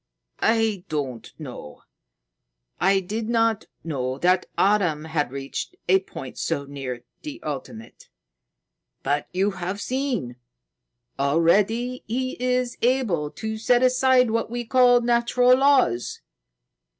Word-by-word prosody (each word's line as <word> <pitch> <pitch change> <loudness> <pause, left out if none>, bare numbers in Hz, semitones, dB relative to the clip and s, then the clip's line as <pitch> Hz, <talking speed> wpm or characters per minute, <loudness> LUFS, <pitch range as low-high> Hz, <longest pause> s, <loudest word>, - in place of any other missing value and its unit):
"I 220 -4 +2
don't 130 -7 -4
know. 125 - -9 1.0
I 195 0 +3
did 215 +4 -4
not 225 -2 +1 0.2
know 130 -5 -3
that 180 +4 +2
Adam 180 -7 +2
had 155 -4 -1
reached 135 0 -5
a 190 +2 +5
point 135 -8 -9
so 145 -4 -2
near 135 -4 -6 0.2
the 300 -1 -7
ultimate. 130 -6 -7 0.9
But 145 +2 0
you 195 +3 +1
have 185 +1 -4
seen. 245 - -2 0.8
Already 200 - +2
he 255 +3 -1
is 250 -1 0
able 230 - +1
to 220 +6 -5
set 245 +3 +3
aside 255 -1 +4
what 230 0 -1
we 240 +1 -4
call 245 0 +5
natural 240 +1 +4
laws." 260 - +2
200 Hz, 115 wpm, -24 LUFS, 150-245 Hz, 1.0 s, a